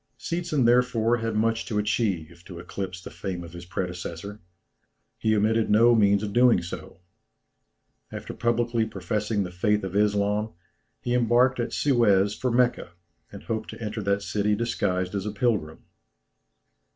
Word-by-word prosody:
Seetzen, 170 Hz, -6 st, -1 dB
therefore, 120 Hz, -1 st, +3 dB
had 115 Hz, -1 st, -3 dB
much 115 Hz, +1 st, 0 dB
to 105 Hz, -, -2 dB
achieve 95 Hz, -6 st, -1 dB
to 90 Hz, -, -9 dB
eclipse 90 Hz, +1 st, -6 dB
the -, -, -9 dB
fame 90 Hz, -3 st, -5 dB
of 85 Hz, 0 st, -11 dB
his 85 Hz, 0 st, -10 dB
predecessor. 90 Hz, +3 st, -5 dB, 0.8 s
He 110 Hz, 0 st, +2 dB
omitted 110 Hz, +2 st, +2 dB
no 115 Hz, +3 st, +6 dB
means 100 Hz, -2 st, +3 dB
of 100 Hz, -1 st, -4 dB
doing 120 Hz, -7 st, +4 dB
so. 90 Hz, +1 st, -8 dB, 1.1 s
After -, -, -7 dB
publicly 120 Hz, 0 st, 0 dB
professing 105 Hz, -1 st, -2 dB
the 90 Hz, -, -6 dB
faith 105 Hz, +4 st, 0 dB
of 95 Hz, 0 st, -5 dB
Islam, 105 Hz, +1 st, +1 dB, 0.5 s
he 120 Hz, -, -2 dB
embarked 125 Hz, +2 st, +3 dB
at 120 Hz, -, -2 dB
Suez 105 Hz, -8 st, +3 dB
for 125 Hz, +4 st, -2 dB
Mecca, 120 Hz, -7 st, +1 dB, 0.4 s
and -, -, -10 dB
hoped 110 Hz, -1 st, -3 dB
to -, -, -9 dB
enter 110 Hz, -1 st, -4 dB
that 100 Hz, 0 st, 0 dB
city 105 Hz, +2 st, 0 dB
disguised 95 Hz, -5 st, -1 dB
as 100 Hz, 0 st, -3 dB
a -, -, -2 dB
pilgrim. 105 Hz, -9 st, -1 dB
105 Hz, 150 wpm, -26 LUFS, 95-115 Hz, 1.1 s, no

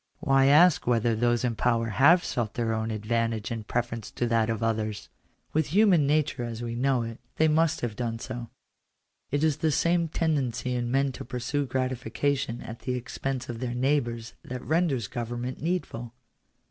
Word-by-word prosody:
Why 135 Hz, -5 st, +4 dB
ask 155 Hz, +2 st, +5 dB
whether 115 Hz, -1 st, +2 dB
those 120 Hz, +1 st, +1 dB
in 120 Hz, -2 st, 0 dB
power 115 Hz, 0 st, +1 dB
have 155 Hz, -, +5 dB
sought 115 Hz, -4 st, -2 dB
their 115 Hz, -2 st, 0 dB
own 110 Hz, 0 st, -2 dB
advantage 115 Hz, 0 st, -1 dB
in 115 Hz, -2 st, -4 dB
preference 120 Hz, -2 st, -2 dB
to 120 Hz, -, -2 dB
that 115 Hz, -1 st, +2 dB
of 115 Hz, 0 st, -2 dB
others? 110 Hz, -2 st, -2 dB, 0.4 s
With 155 Hz, -1 st, +1 dB
human 180 Hz, -4 st, +4 dB
nature 145 Hz, -4 st, +1 dB
as 120 Hz, 0 st, -5 dB
we 115 Hz, -1 st, -3 dB
know 125 Hz, 0 st, +1 dB
it, 115 Hz, 0 st, -7 dB, 0.2 s
they 160 Hz, -, +3 dB
must 160 Hz, +1 st, +2 dB
have 115 Hz, -3 st, -3 dB
done 115 Hz, 0 st, -2 dB
so. 120 Hz, 0 st, -6 dB, 0.8 s
It 145 Hz, +2 st, 0 dB
is 155 Hz, -3 st, +2 dB
this 155 Hz, -3 st, +1 dB
same 170 Hz, 0 st, +2 dB
tendency 135 Hz, -7 st, -1 dB
in 120 Hz, -1 st, -1 dB
men 135 Hz, +2 st, +2 dB
to -, -, -8 dB
pursue 130 Hz, +3 st, -2 dB
gratification 130 Hz, 0 st, -1 dB
at 115 Hz, +1 st, -8 dB
the 125 Hz, +1 st, -2 dB
expense 130 Hz, +1 st, -4 dB
of 120 Hz, -1 st, -5 dB
their 120 Hz, -1 st, -3 dB
neighbours 120 Hz, -3 st, 0 dB
that 125 Hz, 0 st, -7 dB
renders 155 Hz, -, +1 dB
government 120 Hz, +3 st, -4 dB
needful. 125 Hz, -9 st, -3 dB
125 Hz, 175 wpm, -27 LUFS, 115-140 Hz, 0.8 s, ask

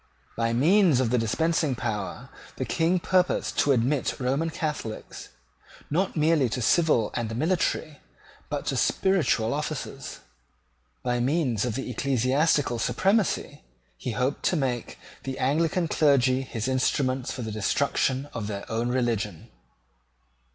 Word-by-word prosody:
By 115 Hz, 0 st, 0 dB
means 160 Hz, -, +4 dB
of 125 Hz, -3 st, +1 dB
the 125 Hz, -, +3 dB
dispensing 155 Hz, +4 st, +1 dB
power 105 Hz, -6 st, -4 dB, 0.3 s
the -, -, -3 dB
King 165 Hz, +3 st, +1 dB
purposed 180 Hz, +1 st, +1 dB
to 145 Hz, -, +4 dB
admit 130 Hz, +2 st, +1 dB
Roman 135 Hz, +6 st, 0 dB
Catholics, 150 Hz, -9 st, -5 dB, 0.6 s
not 180 Hz, +3 st, 0 dB
merely 155 Hz, -4 st, +3 dB
to 125 Hz, -, -3 dB
civil 150 Hz, -7 st, +3 dB
and 110 Hz, -2 st, -3 dB
military, 155 Hz, 0 st, -1 dB, 0.5 s
but -, -, -3 dB
to -, -, -1 dB
spiritual, 150 Hz, -12 st, +2 dB
offices. 145 Hz, -2 st, -5 dB, 0.8 s
By 125 Hz, -1 st, 0 dB
means 125 Hz, -4 st, +1 dB
of 120 Hz, -3 st, -2 dB
the 135 Hz, -, -4 dB
ecclesiastical 135 Hz, -2 st, +1 dB
supremacy 195 Hz, -, 0 dB, 0.3 s
he 110 Hz, -, -5 dB
hoped 125 Hz, +6 st, -1 dB
to -, -, +2 dB
make 130 Hz, -6 st, -2 dB, 0.2 s
the 135 Hz, -1 st, -5 dB
Anglican 165 Hz, +6 st, +1 dB
clergy 135 Hz, -5 st, +3 dB
his 120 Hz, -3 st, -4 dB
instruments 130 Hz, 0 st, 0 dB
for 125 Hz, -, -5 dB
the 110 Hz, -, -4 dB
destruction 130 Hz, +5 st, 0 dB
of 105 Hz, -3 st, -4 dB
their 100 Hz, -2 st, -5 dB
own 115 Hz, +2 st, 0 dB
religion. 115 Hz, -8 st, -2 dB
130 Hz, 130 wpm, -26 LUFS, 120-155 Hz, 0.8 s, means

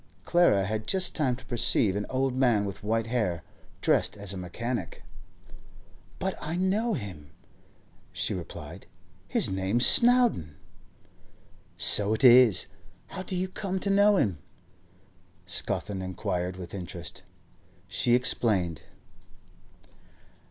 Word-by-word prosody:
Clara 170 Hz, -, +3 dB
had 110 Hz, +1 st, -4 dB
just 190 Hz, -1 st, +2 dB
time 135 Hz, -6 st, 0 dB
to 130 Hz, -, -15 dB
perceive 115 Hz, -5 st, +2 dB
an 105 Hz, 0 st, -3 dB
old 130 Hz, 0 st, -1 dB
man 120 Hz, -6 st, +2 dB
with 100 Hz, +1 st, -7 dB
white 115 Hz, +1 st, -1 dB
hair, 110 Hz, -8 st, -2 dB, 0.4 s
dressed -, -, +1 dB
as 100 Hz, -1 st, -4 dB
a -, -, -6 dB
mechanic. 95 Hz, -, -5 dB, 1.1 s
'But -, -, -3 dB
I 160 Hz, +2 st, -4 dB
know 200 Hz, +5 st, 0 dB
him,' 85 Hz, -8 st, -8 dB, 0.8 s
she -, -, -2 dB
replied. -, -, -9 dB, 0.4 s
'His -, -, +1 dB
name's 95 Hz, +6 st, +1 dB
Snowdon.' 240 Hz, -, +4 dB, 1.2 s
'So 105 Hz, +1 st, +4 dB
it 110 Hz, -, -5 dB
is. 125 Hz, -5 st, +6 dB, 0.4 s
How 185 Hz, -, -7 dB
do 185 Hz, 0 st, -5 dB
you 185 Hz, +1 st, -1 dB
come 190 Hz, 0 st, -4 dB
to 200 Hz, -, -2 dB
know 205 Hz, +1 st, +4 dB
him?' 100 Hz, -, 0 dB, 1.1 s
Scawthorne 100 Hz, -2 st, -2 dB
inquired 90 Hz, -1 st, -4 dB
with 90 Hz, -1 st, -9 dB
interest. 90 Hz, -5 st, -7 dB, 0.7 s
She 120 Hz, -, +2 dB
explained. 100 Hz, -, 0 dB
115 Hz, 120 wpm, -27 LUFS, 95-155 Hz, 1.2 s, is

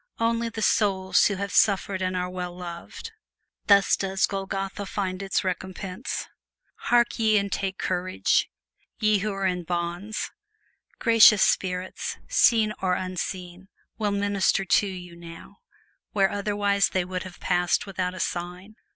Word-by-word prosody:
Only 230 Hz, 0 st, 0 dB
the 220 Hz, -1 st, -4 dB
souls 190 Hz, -3 st, +3 dB
who 200 Hz, -, -1 dB
have 200 Hz, +1 st, -4 dB
suffered 195 Hz, -2 st, +2 dB
are 185 Hz, -1 st, -1 dB
well 180 Hz, -1 st, -6 dB
loved. 175 Hz, -, -8 dB, 0.6 s
Thus 200 Hz, -1 st, +5 dB
does 195 Hz, -1 st, 0 dB
Golgotha 195 Hz, 0 st, -4 dB
find 190 Hz, -2 st, -3 dB
its 195 Hz, +1 st, -1 dB
recompense. 185 Hz, +3 st, -4 dB, 0.6 s
Hark 240 Hz, 0 st, +2 dB
ye 220 Hz, -1 st, +4 dB
and 200 Hz, -1 st, -1 dB
take 190 Hz, -1 st, -2 dB
courage, 185 Hz, 0 st, 0 dB, 0.5 s
ye 215 Hz, -2 st, +3 dB
who 210 Hz, +2 st, -2 dB
are 195 Hz, 0 st, -3 dB
in 180 Hz, -1 st, 0 dB
bonds! 175 Hz, +5 st, -3 dB, 0.7 s
Gracious 225 Hz, -3 st, +6 dB
spirits, 185 Hz, 0 st, -1 dB
seen 225 Hz, -, +4 dB
or 185 Hz, -1 st, +1 dB
unseen, 185 Hz, 0 st, -5 dB, 0.3 s
will 210 Hz, -1 st, +1 dB
minister 200 Hz, -1 st, +1 dB
to 200 Hz, +3 st, +3 dB
you 180 Hz, -2 st, -8 dB
now, 170 Hz, -1 st, -12 dB, 0.6 s
where 195 Hz, -2 st, +3 dB
otherwise 205 Hz, -1 st, +1 dB
they 185 Hz, -1 st, -1 dB
would 185 Hz, 0 st, -4 dB
have 185 Hz, -1 st, -10 dB
passed 175 Hz, -1 st, +1 dB
without 185 Hz, -2 st, -3 dB
a -, -, -8 dB
sign! 180 Hz, +5 st, -4 dB
190 Hz, 140 wpm, -25 LUFS, 180-205 Hz, 0.7 s, Gracious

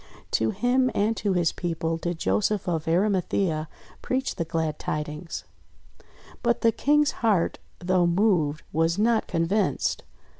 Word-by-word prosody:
To 110 Hz, -, +2 dB
him 255 Hz, -, +2 dB
and 215 Hz, +3 st, +1 dB
to 200 Hz, -2 st, 0 dB
his 175 Hz, -3 st, +2 dB
people 165 Hz, -2 st, -2 dB
did 175 Hz, 0 st, -3 dB
Joseph 205 Hz, +3 st, 0 dB
of 165 Hz, -3 st, -1 dB
Arimathea 180 Hz, -3 st, +1 dB, 0.3 s
preach 260 Hz, +1 st, -1 dB
the 170 Hz, -, -3 dB
glad 160 Hz, -1 st, -2 dB
tidings; 150 Hz, +2 st, -4 dB, 1.0 s
but 235 Hz, -1 st, +1 dB
the 230 Hz, -, +4 dB
King's 295 Hz, +4 st, +2 dB
heart, 210 Hz, -7 st, +2 dB, 0.2 s
though 180 Hz, -1 st, +2 dB
moved, 170 Hz, -5 st, +2 dB
was 165 Hz, +2 st, +1 dB
not 225 Hz, +1 st, +2 dB
convinced. 180 Hz, +5 st, 0 dB
180 Hz, 135 wpm, -26 LUFS, 165-215 Hz, 1.0 s, the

